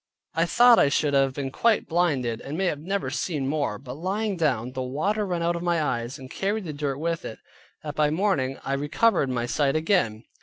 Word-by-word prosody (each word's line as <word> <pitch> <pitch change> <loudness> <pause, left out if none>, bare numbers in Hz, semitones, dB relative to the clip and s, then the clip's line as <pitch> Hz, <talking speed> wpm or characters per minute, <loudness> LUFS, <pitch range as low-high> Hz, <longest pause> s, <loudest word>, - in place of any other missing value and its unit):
I 165 +1 +1
thought 240 +4 +6
I 140 - +5
should 145 +1 +1
have 135 -1 +2
been 135 -2 -3
quite 230 - +2
blinded, 140 -10 0
and 150 +5 -5
have 175 -6 0
never 195 +5 -2
seen 150 -7 -2
more, 140 -7 -1
but 125 +1 -9
lying 195 +7 -2
down, 130 -8 0
the 130 0 -4
water 195 +12 -1
run 175 -2 -1
out 170 +1 +1
of 170 - -4
my 175 -1 +1
eyes, 125 -2 -2
and 130 -2 -10
carried 200 +9 -2
the 160 -4 -5
dirt 145 -2 -2
with 165 +2 -2
it, 110 - -7 0.5
that 150 -1 -5
by 150 0 +2
the 150 - -1
morning 160 -9 0
I 135 - -2
recovered 145 +3 +2
my 120 -2 -1
sight 135 +4 +1
again. 155 - +1
150 Hz, 220 wpm, -25 LUFS, 135-175 Hz, 0.5 s, thought